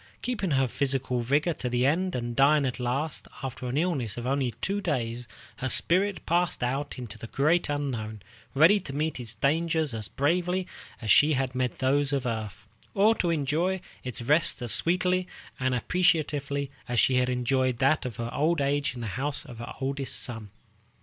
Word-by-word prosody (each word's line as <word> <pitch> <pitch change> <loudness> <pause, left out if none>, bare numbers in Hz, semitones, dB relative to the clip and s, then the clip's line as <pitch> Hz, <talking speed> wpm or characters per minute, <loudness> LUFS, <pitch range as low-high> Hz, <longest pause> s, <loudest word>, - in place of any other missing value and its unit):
Keeping 225 -7 -1
her 135 -3 +2
physical 130 -1 0
vigor 145 +8 +1
to 125 - -4
the 125 +1 +1
end, 180 +6 +1
and 120 -1 -3
dying 140 +2 +4
at 130 0 -3
last, 135 +6 -2 0.2
after 130 -1 -5
an 125 +3 -2
illness 145 - 0
of 120 - -5
only 135 -1 +1
two 200 +8 -1
days, 120 - -2 0.3
her 130 - -2
spirit 185 +3 +3
passed 170 -4 +1
out 135 +4 -2
into 120 -4 -8
the 115 - -7
great 155 +8 +1
unknown, 115 -8 -3 0.3
ready 165 +9 +6
to 140 -7 -8
meet 155 -1 -1
its 115 -2 -5
dangers 160 - +1
as 110 -2 -3
bravely 180 +5 0 0.4
as 110 - +1
she 150 +1 +6
had 130 -2 -1
met 125 -1 -1
those 140 +2 +2
of 135 -3 0
earth, 110 -3 -4 0.3
or 210 +3 +5
to 180 -6 -1
enjoy 165 +5 0 0.2
its 125 -2 -4
rest 150 +7 +3
as 120 - 0
sweetly 180 - +2 0.3
and 130 0 +1
appreciatively 145 -3 0 0.2
as 120 -1 +1
she 130 +4 +4
had 125 0 +2
enjoyed 130 0 +1
that 135 +5 +2
of 125 -4 -5
her 115 +2 -4
old 160 +3 +1
age 140 -1 0
in 120 - -6
the - - -4 0.2
house 145 0 -1
of 120 -2 -11
her 120 - -7
oldest 135 0 -2
son. 115 -4 -4
140 Hz, 185 wpm, -27 LUFS, 125-160 Hz, 0.4 s, ready